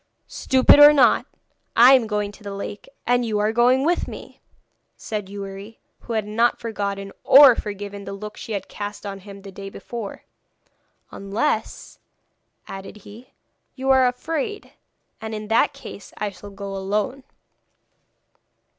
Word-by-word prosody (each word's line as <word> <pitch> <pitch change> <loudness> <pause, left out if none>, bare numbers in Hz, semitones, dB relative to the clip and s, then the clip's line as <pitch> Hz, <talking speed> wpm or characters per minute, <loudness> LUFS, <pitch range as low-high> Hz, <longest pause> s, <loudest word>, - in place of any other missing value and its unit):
'Stupid 265 +2 +4
or 290 0 +10
not, 265 -5 +4 0.5
I 245 +3 +8
am 250 -4 +4
going 210 -1 -2
to 205 - -18
the 200 -1 -6
lake, 200 +1 -7 0.2
and 245 0 +2
you 220 -3 -1
are 210 +1 +1
going 250 +4 +3
with 350 +2 +1
me!' - - -11 0.6
said 210 -3 -5
Youri, 200 +2 -8 0.2
who 235 - -7
had 220 -2 -1
not 230 +3 +1
forgotten 200 -3 -4
or 270 -2 +8
forgiven 200 -1 -6
the 195 - -7
look 210 +2 -8
she 225 - -7
had 200 - -4
cast 205 0 -7
on 195 -1 -6
him 200 0 -12
the 195 - -10
day 195 +1 -8
before. 225 +1 -8 0.9
'Unless,' 200 +9 -3 0.7
added 195 +2 -9
he, 225 +5 -13 0.5
'you 265 0 0
are 260 -1 +5
afraid, 320 +10 -4 0.5
and 220 0 -5
in 215 0 -7
that 225 - +3
case 200 - -11
I 210 -1 -3
shall 205 +1 -12
go 200 0 -7
alone.' 205 +7 -2
210 Hz, 150 wpm, -22 LUFS, 200-245 Hz, 0.9 s, or